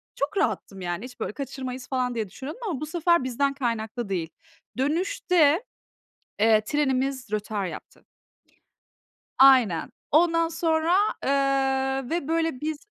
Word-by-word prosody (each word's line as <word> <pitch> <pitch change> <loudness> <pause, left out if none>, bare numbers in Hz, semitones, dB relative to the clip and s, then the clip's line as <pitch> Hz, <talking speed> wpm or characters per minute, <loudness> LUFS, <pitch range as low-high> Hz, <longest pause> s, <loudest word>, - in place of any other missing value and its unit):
çok 280 +8 -2
rahattım 195 - -1
yani. 175 +5 -3
Hiç, 250 -1 -12
böyle, - - -3
"Kaçırmayız." 260 -1 -6
falan 255 -2 -1
diye 220 -4 -2
düşünüyordum 280 - -8
ama 300 -6 -3
bu 305 - -2
sefer 340 0 +2
bizden 275 +2 0
kaynaklı 230 -3 -3
değil. 170 -4 -2 0.5
Dönüşte, 330 - +2 0.8
eee, 215 0 +5
trenimiz 265 -1 -1
rötar 210 -1 -2
yaptı. 170 - -9 1.3
Aynen. 255 -10 +5 0.2
Ondan 330 +1 +4
sonra, 325 +1 +1 0.3
eee, 270 -1 +1
ve, 330 -4 -2
böyle, 325 -4 0
biz 310 0 -2
270 Hz, 125 wpm, -25 LUFS, 240-315 Hz, 1.3 s, eee